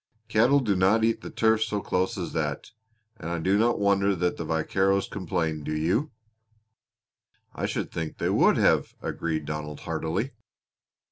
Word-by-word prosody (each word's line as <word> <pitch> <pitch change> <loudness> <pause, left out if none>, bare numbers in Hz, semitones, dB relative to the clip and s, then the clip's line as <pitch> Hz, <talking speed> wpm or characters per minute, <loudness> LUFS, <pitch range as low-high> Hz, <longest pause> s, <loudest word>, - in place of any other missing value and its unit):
Cattle 120 +6 +4
do 105 -6 +1
not 95 +5 +3
eat 115 0 +1
the - - -7
turf 110 -1 +2
so 105 -2 -2
close 95 -1 -1
as 90 -3 -4
that, 75 +4 -3 0.5
and 85 - -6
I 85 - -2
do 95 +4 +1
not 115 +3 +3
wonder 100 -1 +2
that 90 0 0
the - - -5
vaqueros 95 +5 +1
complained, 80 -5 -2
do 75 +1 -2
you?" 90 - 0 1.4
"I - - -2
should - - -3
think 80 -2 -4
they - - 0
would - - +4
have!" - - +2
agreed 80 -2 -2
Donald 75 0 -5
heartily. 95 +12 -2
95 Hz, 160 wpm, -26 LUFS, 80-105 Hz, 1.4 s, Cattle